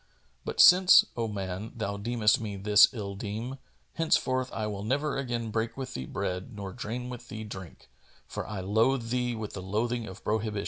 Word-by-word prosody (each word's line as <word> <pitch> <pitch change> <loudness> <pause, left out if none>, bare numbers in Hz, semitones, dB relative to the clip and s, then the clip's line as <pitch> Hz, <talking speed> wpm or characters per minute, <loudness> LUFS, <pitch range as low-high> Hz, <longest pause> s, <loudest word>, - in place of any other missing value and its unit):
But - - -5
since, 180 0 +8
O 115 -1 -1
man, 100 0 -5
thou 100 -3 -3
deemest 110 +1 +2
me 105 -3 -4
this 105 +1 +6
ill 100 -4 -5
deme, 110 +6 -5 0.3
henceforth 130 -5 +1
I 110 - -3
will 100 -2 -4
never 140 +6 0
again 120 -4 -3
break 115 +3 -2
with 130 -1 -5
thee 65 0 -5
bread 90 +5 -4
nor 100 -2 -6
drain 125 +1 -5
with 125 0 -9
thee 110 0 -6
drink, 95 -5 -10 0.4
for - - -6
I 105 -3 -4
loathe 115 +5 +1
thee 125 -1 0
with 110 -2 -6
the 95 - -5
loathing 110 +4 -2
of 95 +1 -10
prohibition. 110 -1 -1
110 Hz, 185 wpm, -28 LUFS, 100-125 Hz, 0.4 s, since